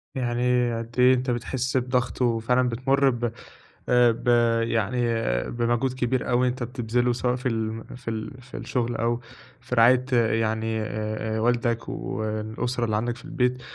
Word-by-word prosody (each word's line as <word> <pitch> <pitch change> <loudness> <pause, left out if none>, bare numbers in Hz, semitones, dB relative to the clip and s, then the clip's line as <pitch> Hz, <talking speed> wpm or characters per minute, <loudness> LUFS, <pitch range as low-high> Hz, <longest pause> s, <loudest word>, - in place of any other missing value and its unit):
يعني 125 -1 +1
قد 115 +1 -7
إيه 125 +1 +7
أنتَ 130 0 -1
بتحس 130 +2 -1
بضغط 125 0 -1
وفعلًا 125 +1 +2
بتمُر 135 +3 +2
ب 120 -2 -1 0.6
آآ 125 -1 +5
ب 115 - -7 0.4
يعني 115 +1 0 0.5
بمجهود 120 +2 0
كبير 130 0 -1
أوي 125 +1 +3
أنتَ 125 0 -2
بتبذله 120 0 0
سواء 125 +1 0
في 125 +1 -3
ال 110 0 -3
في 125 - -20
ال 110 +4 -6
في 130 - -10
الشغل 120 -2 -2
أو 120 +1 0 0.4
في 125 - -4
رعاية 125 +2 +5
يعني 110 -1 +1
آآ، 110 0 -3
آآ - - -1
والدك 120 0 0
والأسرة 110 +3 -3
اللي 110 - -1
عندك 120 +2 -1
في 125 - -14
البيت، 125 0 0
120 Hz, 155 wpm, -25 LUFS, 115-125 Hz, 0.6 s, إيه